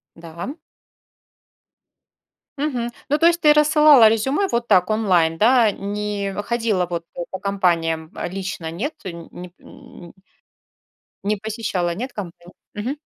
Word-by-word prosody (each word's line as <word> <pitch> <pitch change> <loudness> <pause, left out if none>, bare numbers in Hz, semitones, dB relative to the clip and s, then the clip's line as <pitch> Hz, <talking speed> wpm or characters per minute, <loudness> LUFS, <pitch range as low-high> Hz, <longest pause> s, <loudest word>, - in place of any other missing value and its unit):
Да. 170 - -8 2.0
Мгм. 250 -5 -2 0.2
Ну, 295 - +2
то 330 - +2
есть 340 0 +4
ты 300 - +6
рассылала 300 -5 +6
резюме 265 - +1
вот 235 0 -1
так 180 +2 +4
онлайн, 180 -7 +2
да? 230 -1 +5
Не 200 0 -4
ходила, 225 -5 0
вот, 170 -1 -5 0.3
по 190 - -5
компаниям, 170 -5 0
э, - - -4
лично, 190 -3 -5
нет, 220 - -4
э, - - -3
нь 170 -1 -10
неп 180 0 -10
н 170 -1 -14 1.1
не 210 0 0
посещала, 200 -5 -3
нет 245 +5 -5
компан 175 -3 -9 0.2
Мгм. 240 +8 -3
205 Hz, 135 wpm, -21 LUFS, 175-240 Hz, 2.0 s, ты